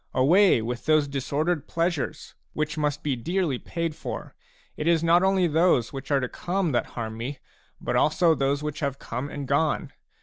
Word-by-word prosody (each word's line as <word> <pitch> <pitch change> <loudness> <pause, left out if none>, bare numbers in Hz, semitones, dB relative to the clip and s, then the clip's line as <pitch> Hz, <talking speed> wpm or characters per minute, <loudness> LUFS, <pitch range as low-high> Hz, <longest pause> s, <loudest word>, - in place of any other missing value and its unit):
Away 160 - +5
with 120 +4 -5
those 155 -2 +4
disordered 145 +3 -1
pleasures, 165 -3 -2 0.2
which 155 -1 -2
must 150 -1 -1
be 145 -3 0
dearly 160 +1 -1
paid 170 -2 -3
for; - - -6 0.4
it 150 - -3
is 170 -1 +3
not 170 +1 +5
only 190 -1 +3
those 160 -7 +2
which 135 0 -7
are 140 -2 +3
to 130 - -2
come 180 +2 -2
that 120 - 0
harm 110 -1 -3
me, 130 +5 -4 0.4
but - - -2
also 165 +2 +4
those 140 0 0
which 150 -1 -4
have 140 -2 -2
come 125 +3 -5
and 145 -2 -6
gone. 145 +3 0
150 Hz, 180 wpm, -26 LUFS, 135-170 Hz, 0.4 s, Away